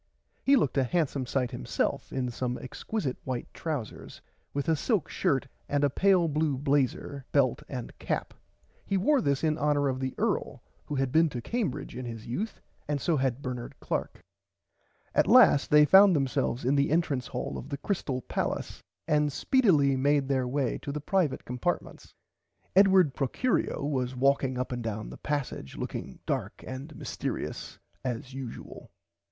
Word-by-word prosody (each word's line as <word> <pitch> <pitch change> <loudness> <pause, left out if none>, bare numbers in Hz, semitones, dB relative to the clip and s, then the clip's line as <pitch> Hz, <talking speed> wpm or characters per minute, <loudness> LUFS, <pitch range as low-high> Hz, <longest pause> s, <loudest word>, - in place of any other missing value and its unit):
He 275 - +5
looked 145 - +2
a - - +3
handsome 140 -2 0
sight 125 -1 0
himself 60 - -2
in 125 -2 -2
some 125 +1 -2
exquisite 135 - -4
white 130 -2 -3
trousers 145 -10 -5 0.3
with 140 +2 -3
a 160 - +4
silk 200 - 0
shirt 140 -7 0 0.2
and 145 0 +1
a 145 - +3
pale 185 +1 +4
blue 150 -2 0
blazer 140 0 0
belt 130 -4 +2
and 125 -3 -6
cap. - - -2 0.5
He 195 - 0
wore 270 +8 +3
this 140 -6 0
in 155 -1 +1
honour 145 -1 +2
of 130 0 -2
the 130 -1 -3
earl - - -1 0.2
who 145 - -3
had 135 -2 0
been 160 +2 +4
to 125 - -5
Cambridge 160 - -3
in 125 0 -5
his 115 -2 -7
youth 200 - -4 0.3
and 145 -1 0
so 170 +3 +1
had 135 0 -1
Bernard 125 -2 -5
Clark. - - -3 0.9
At - - +3
last 140 - +6
they 150 0 +7
found 190 +2 +7
themselves 130 -3 0
in 130 - +3
the 140 0 +3
entrance 145 -6 +1
hall - - -4
of 135 - -7
the 140 - -3
Crystale 140 -7 -2
palace - - -3 0.3
and 150 -1 +2
speedily 155 - +3
made 140 +1 +2
their 130 -2 +1
way 130 -1 -1
to 140 - -5
the 150 - -3
privite 150 -3 0
compartments. 125 +8 -3 0.6
Edward 190 -6 +6
Procurio 145 - 0
was 130 -3 -1
walking 135 0 +2
up 125 +1 -2
and 125 -1 -3
down 110 -1 -4
the - - -9
passage 145 - -4
looking - - -5
dark - - -3
and 135 +4 -7
mystearious - - -4 0.3
as 125 0 -4
usual. 130 -3 -8
140 Hz, 165 wpm, -29 LUFS, 130-155 Hz, 0.9 s, they